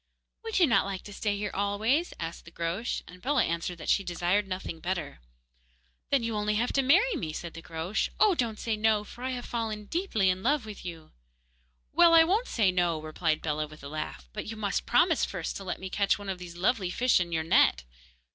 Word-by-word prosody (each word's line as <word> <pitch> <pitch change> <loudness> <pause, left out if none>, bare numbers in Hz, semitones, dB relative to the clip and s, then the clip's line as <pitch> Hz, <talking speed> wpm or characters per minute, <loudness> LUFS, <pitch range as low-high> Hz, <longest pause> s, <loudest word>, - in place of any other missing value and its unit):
'Would 450 -1 -2
you 365 - +6
not 230 -7 +3
like 195 -2 -4
to 205 - -10
stay 205 0 -1
here 205 0 -3
always?' 215 - +1
asked 165 0 -6
the 170 - -12
Groac'h; 170 +8 -2
and 180 0 -13
Bellah 270 -1 +2
answered 170 +1 -2
that 160 - -9
she 195 - +3
desired 180 +3 0
nothing 185 -3 -5
better. 175 - -4 0.9
'Then 275 -4 +2
you 230 0 -1
have 210 - -1
only 210 0 0
to 245 +4 +1
marry 375 - +4
me,' 160 - -3
said 170 +1 -6
the 165 - -8
Groac'h. 165 +5 -2
'Oh! 420 -2 +6
don't 235 -9 -1
say 225 -2 -1
no, 215 -1 +2
for 240 +4 -11
I 260 - -1
have 250 -1 -4
fallen 220 -3 -3
deeply 220 - +1
in 185 +1 -4
love 275 +2 +1
with 215 -2 -9
you.' 165 -3 -8 0.8
'Well, 340 +1 +7
I 325 - +9
won't 410 +9 +1
say 210 -5 +2
"No,"' 175 -3 +1
replied 155 0 -1
Bellah, 155 -1 -1
with 155 -1 -14
a 140 - -7
laugh, 65 - -5
'but - - -5
you 220 +1 -6
must 205 -2 -2
promise 320 +6 +4
first 175 -5 -3
to 195 - -8
let 185 - -4
me 190 - -5
catch 200 +1 +1
one 205 -1 -7
of 190 -1 -3
those 175 -1 -9
lovely 190 0 +1
fish 250 +5 +3
in 175 -1 -2
your 160 -1 0
net. 65 - +4
200 Hz, 225 wpm, -29 LUFS, 170-240 Hz, 0.9 s, I